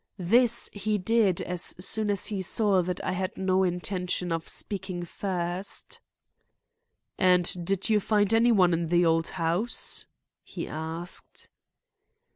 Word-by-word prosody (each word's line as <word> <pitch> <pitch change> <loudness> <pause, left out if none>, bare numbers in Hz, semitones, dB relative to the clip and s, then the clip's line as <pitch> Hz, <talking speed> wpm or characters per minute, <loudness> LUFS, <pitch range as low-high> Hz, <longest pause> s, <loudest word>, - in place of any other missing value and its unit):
This 235 +6 +3
he 210 +1 -1
did 205 -2 +2
as 180 -1 -1
soon 215 +3 +1
as 200 -2 +1
he 205 -3 -2
saw 195 0 +3
that 180 0 -3
I - - 0
had 185 +1 -3
no 190 0 +1
intention 180 0 -1
of 165 0 -2
speaking 190 -3 -4
first. 180 0 -3 1.2
"And 180 -1 +3
did 195 +3 -1
you 215 -2 +3
find 205 0 +1
any 230 +2 +5
one 185 -5 +4
in 165 0 0
the 175 +1 +3
old 165 0 +2
house?" 175 +7 -2 0.4
he - - -6
asked. 160 +3 -5
185 Hz, 135 wpm, -27 LUFS, 175-205 Hz, 1.2 s, any